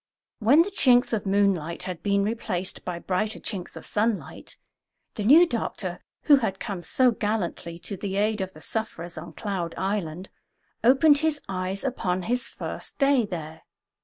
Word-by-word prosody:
When 265 +9 +6
the 405 - -6
chinks 250 - +4
of 210 -2 -1
moonlight 190 -5 +1
had 180 -3 -5
been 200 -1 +2
replaced 200 -4 -3
by 180 -2 -4
brighter 195 +5 -2
chinks 190 -5 -5
of - - -9
sunlight, 215 0 -2 0.6
the 210 - -4
new 300 +11 +8
doctor 345 - -3 0.2
who 290 -2 +7
had 195 -7 -2
come 195 -4 -4
so 255 +7 +3
gallantly 205 -6 -2
to 200 - -4
the 195 0 -4
aid 210 +1 +1
of 190 0 -4
the 155 - -14
sufferers 175 -6 -4
on 160 +1 -8
Cloud 190 -5 -3
Island 190 -3 -3 0.5
opened 280 +4 +6
his 315 -1 0
eyes 190 +1 -3
upon 185 -9 -1
his 245 +4 -1
first - - -6
day 275 -5 +3
there. 160 -3 -6
200 Hz, 160 wpm, -26 LUFS, 180-235 Hz, 0.6 s, new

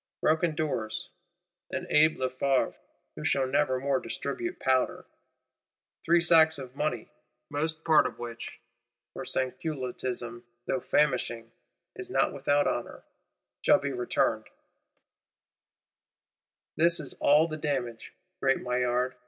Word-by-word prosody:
Broken 160 +1 +2
doors; 115 -9 -3 0.6
an - - -4
Abbé 155 +1 +5
Lefevre, 130 +1 0 0.4
who 75 - -7
shall 135 -1 +2
never 130 0 +1
more 135 0 +1
distribute 355 - -4
powder; 130 -1 +1 1.0
three 170 +1 +4
sacks 160 -2 +5
of 130 -2 -9
money, 140 -7 -2 0.4
most 160 +2 -2
part 155 -2 +5
of - - -9
which 120 -1 -7 0.5
(for - - -6
Sansculottism, 130 -3 -3 0.2
though 130 - 0
famishing, 120 -5 0 0.4
is 375 -1 -7
not - - +1
without 145 +1 +2
honour) - - -3 0.6
shall - - +6
be 140 0 -3
returned: 125 -2 0 2.3
this 170 +2 +4
is 145 - -2
all 150 +3 +5
the 155 - -5
damage. 135 -6 -3 0.3
Great 135 -1 +3
Maillard! 125 0 0
135 Hz, 115 wpm, -28 LUFS, 125-155 Hz, 2.3 s, shall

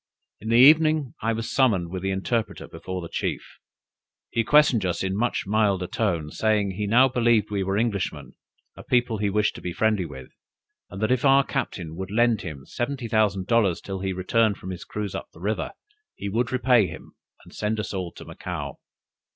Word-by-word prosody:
In 110 - -6
the 115 - +3
evening 155 +1 +6
I 115 - +1
was 115 0 -4
summoned 105 -11 +2
with 95 -1 -4
the 95 - -2
interpreter 105 +4 -2
before 90 +2 -6
the - - -5
chief. - - -4 0.7
He 115 - +1
questioned 140 -4 +4
us 90 -1 -1
in 95 - -1
a - - -2
much 120 +4 0
milder 100 -2 +1
tone, 90 -8 -1
saying, 105 -3 +1
he 105 +2 -3
now 125 +5 +5
believed 120 -4 +2
we 100 -1 -1
were 95 +1 -1
Englishmen, 105 -5 -2 0.4
a - - -10
people 120 -3 +1
he 105 -1 +1
wished 105 +2 +1
to - - -10
be 90 - -4
friendly 105 -1 +1
with; 65 -4 -10 0.6
and 95 +3 -6
that 110 - +1
if 130 -1 +1
our 135 0 +6
captain 90 - -4
would 95 0 -5
lend 115 0 +2
him 70 -6 -8
seventy 125 0 -3
thousand 105 -4 +1
dollars 105 -7 +2
till 95 -1 -6
he 95 0 -2
returned 100 +3 +1
from 95 - -7
his 90 - -7
cruise 105 -3 -4
up - - -6
the - - -15
river, 105 +4 -2 0.5
he 100 - -5
would 115 +3 -1
repay 125 -5 +3
him, 80 - -10 0.3
and - - -16
send 110 +1 -2
us 105 - -4
all 90 -3 -3
to - - -11
Macao. - - -6
105 Hz, 200 wpm, -25 LUFS, 95-120 Hz, 0.7 s, evening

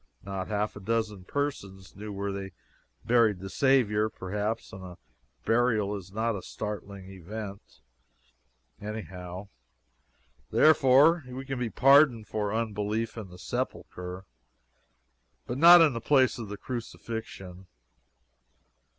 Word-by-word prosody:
Not 95 -1 -5
half 105 0 -2
a - - -8
dozen 105 -2 -2
persons 100 -9 -4
knew 105 +2 -7
where 100 0 -3
they 95 -1 -6 0.5
buried 115 -4 +3
the 95 +1 -8
Saviour, 110 -6 +2
perhaps, 105 +4 -4
and 95 0 -9
a 90 -2 -10 0.5
burial 115 -3 +2
is 95 -2 -9
not 110 +2 -1
a 95 - -5
startling 100 -2 -7
event, 100 - -9 1.0
any 105 +1 -4
how; 90 +1 -9 1.0
therefore, 155 +2 +5
we 130 +1 -7
can 135 -1 -4
be 120 -2 -1
pardoned 135 -3 +5
for 105 -2 -2
unbelief 110 0 -2
in 110 -5 -7
the 90 - -13
Sepulchre, 90 +1 -5 1.2
but 125 +2 -4
not 170 +2 +9
in 155 -4 +5
the 115 - -4
place 130 -1 +3
of 110 -3 -6
the 105 - -6
Crucifixion. 110 -6 -7
105 Hz, 125 wpm, -28 LUFS, 95-120 Hz, 1.2 s, not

